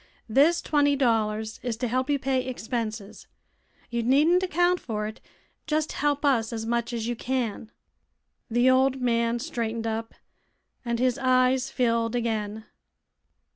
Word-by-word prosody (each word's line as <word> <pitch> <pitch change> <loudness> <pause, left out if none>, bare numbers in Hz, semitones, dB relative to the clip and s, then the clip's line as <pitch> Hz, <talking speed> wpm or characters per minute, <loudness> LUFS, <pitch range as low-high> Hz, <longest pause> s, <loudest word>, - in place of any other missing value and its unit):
This 290 +9 +3
twenty 290 -1 +2
dollars 220 -4 0
is 240 -3 -3
to 245 +1 -2
help 255 +4 -1
you 290 - +3
pay 265 -1 0
expenses. 225 -4 -5 0.6
You 235 0 0
needn't 295 +9 +4
account 360 0 +2
for 210 -3 -4
it; 215 +1 -7 0.5
just 310 0 0
help 290 0 0
us 235 -6 +2
as 225 -1 -4
much 235 +1 -1
as 230 -1 -3
you 240 - -1
can." 235 -3 -3 0.8
The 240 +2 +2
old 260 +1 +3
man 235 -1 +1
straightened 230 -1 -3
up 225 0 -3 0.7
and 235 -1 -1
his 250 +1 +1
eyes 255 0 +2
filled 230 -2 0
again. 220 -2 -2
240 Hz, 140 wpm, -26 LUFS, 225-265 Hz, 0.8 s, needn't